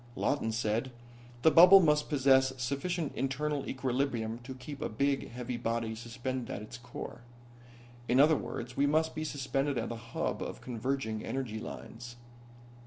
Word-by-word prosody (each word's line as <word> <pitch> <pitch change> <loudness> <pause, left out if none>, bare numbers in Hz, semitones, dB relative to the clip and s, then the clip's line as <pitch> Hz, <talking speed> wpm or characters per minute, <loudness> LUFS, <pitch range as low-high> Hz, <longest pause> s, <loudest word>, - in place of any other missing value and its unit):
Lawton 125 -6 0
said: 115 +3 -1 0.5
"The 160 - +7
bubble 180 +5 +10
must 150 -4 +3
possess 135 -2 +4
sufficient 140 +6 -2
internal 140 +2 -1
equilibrium 125 -4 -1
to 130 +2 -8
keep 140 +2 -8
a - - -1
big, 140 +4 0
heavy 125 0 -5
body 115 -1 -2
suspended 120 +2 -5
at 105 - -4
its 105 - -9
core. 120 0 -8 0.9
In 125 - +3
other 155 +3 +7
words, 125 -3 -5
we 140 +1 +3
must 160 +2 +2
be 155 - -3
suspended 140 -1 -1
at - - -2
the 120 - -4
hub 115 0 -3
of - - -5
converging 120 -2 -3
energy 125 -5 -3
lines." 120 +2 -8
130 Hz, 155 wpm, -31 LUFS, 120-145 Hz, 0.9 s, bubble